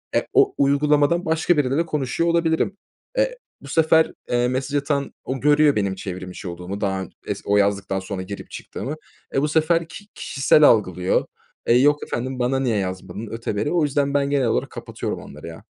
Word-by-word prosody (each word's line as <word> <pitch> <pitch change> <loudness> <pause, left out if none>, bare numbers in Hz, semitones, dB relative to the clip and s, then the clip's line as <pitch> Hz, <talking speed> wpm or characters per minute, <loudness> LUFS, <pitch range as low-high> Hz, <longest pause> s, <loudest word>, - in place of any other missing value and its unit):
E, - - +1
o 405 0 +4
uygulamadan 145 +4 +3
başka 160 +1 +2
biriyle 135 0 +1
de 165 - +2
konuşuyor 150 +2 -1
olabilirim. 170 +3 +1 0.4
E - - +1 0.2
bu 140 - -12
sefer, 160 +2 +3 0.2
eee, 120 0 +2
mesaj 130 +3 -2
atan 140 0 -1
o 130 0 -3
görüyor 150 0 +4
benim 100 -2 0
çevrim 95 -1 -6
içi 90 - -8
olduğumu 90 +4 -6
daha 95 -1 0
ön 95 - -8 0.2
es - - -3
o 100 0 +3
yazdıktan 100 -1 +1
sonra 95 0 -5
girip 100 +2 -8
çıktığımı. 145 +4 -6 0.4
E, 135 - +3
bu 150 - +1
sefer 160 +2 +2
ki 180 +4 -11
kişisel 150 +2 +3
algılıyor. 95 - +3 0.4
Eee, 120 - +5
yok 145 +3 +3
efendim, 130 +1 -4
"Bana 130 +2 +1
niye 120 -5 +1
yazmadın?" 95 +2 -4
öteberi 115 +3 -2
o 170 -3 +2
yüzden 140 -1 0
ben 140 -1 +1
genel 135 -4 +2
olarak - - 0
kapatıyorum - - -5
onları - - -11
ya. 80 0 -10
135 Hz, 185 wpm, -22 LUFS, 100-150 Hz, 0.4 s, Eee